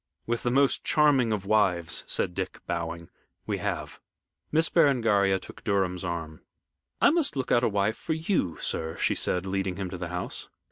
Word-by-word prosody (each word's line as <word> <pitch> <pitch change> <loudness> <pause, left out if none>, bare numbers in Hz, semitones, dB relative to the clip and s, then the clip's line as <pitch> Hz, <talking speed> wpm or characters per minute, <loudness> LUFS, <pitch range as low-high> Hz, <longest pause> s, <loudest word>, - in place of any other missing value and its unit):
"With 120 0 -1
the 120 - 0
most 135 +2 +2
charming 145 -7 +3
of 105 -3 -2
wives," 95 -6 +2
said 90 - 0
Dick, - - -4
bowing. 85 0 -4 0.3
"We - - -2
have." - - -4 0.5
Miss 160 +1 +4
Berengaria 115 - +3
took 95 - -12
Durham's 95 -3 0
arm. 80 -3 -5 0.6
"I - - +6
must 320 - +1
look 130 -2 -2
out 120 - +4
a - - +3
wife 100 +2 0
for 160 - -2
you, 160 - -1
sir," 80 +1 -3
she - - +2
said, 90 0 0
leading 95 -1 -1
him 95 -1 -4
to 95 - -6
the 90 - -3
house. 90 +1 -5
100 Hz, 180 wpm, -27 LUFS, 90-125 Hz, 0.6 s, I